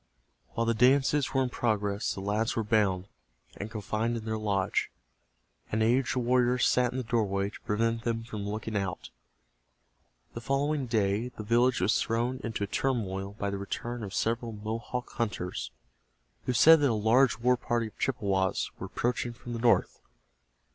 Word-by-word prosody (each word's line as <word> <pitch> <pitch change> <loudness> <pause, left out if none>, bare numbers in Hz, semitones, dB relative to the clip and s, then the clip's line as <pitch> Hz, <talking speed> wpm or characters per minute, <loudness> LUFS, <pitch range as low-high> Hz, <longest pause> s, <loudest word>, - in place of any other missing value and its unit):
While 115 - 0
the 115 - +2
dances 135 +4 +3
were 135 -1 +2
in 125 - -1
progress 105 -3 -1
the 95 - -6
lads 105 +3 0
were 115 - 0
bound, 100 -4 +1 0.5
and 105 - -5
confined 110 +2 -2
in 110 - -7
their 110 0 -1
lodge. 100 -3 0 0.8
An 110 +1 +1
aged 120 +1 +2
warrior 125 0 +2
sat 125 0 +3
in 130 - -5
the 130 - -2
doorway 100 -4 0
to - - -12
prevent 115 +2 0
them 115 -1 -1
from 105 -3 -5
looking 110 +1 -4
out. 95 -3 -3 1.2
The 115 - -6
following 135 +2 0
day 105 0 +1
the 120 -3 -8
village 120 +4 +3
was - - +2
thrown 120 +3 -1
into 115 -3 -3
a - - -1
turmoil 100 -6 -2
by 100 -2 -2
the 100 - -3
return 120 +4 -4
of 100 -2 -6
several 115 0 -1
Mohawk 115 +4 -4
hunters 105 -6 -2 0.8
who 125 - +1
said 160 +8 +8
that 145 -2 +3
a - - +1
large 115 +5 +3
war 125 +2 +3
party 120 -1 -1
of 110 - -11
Chippewas 100 -7 0
were - - -5
approaching 120 0 -1
from 120 0 -8
the 115 - -3
north. 115 0 +2
115 Hz, 170 wpm, -29 LUFS, 105-125 Hz, 1.2 s, said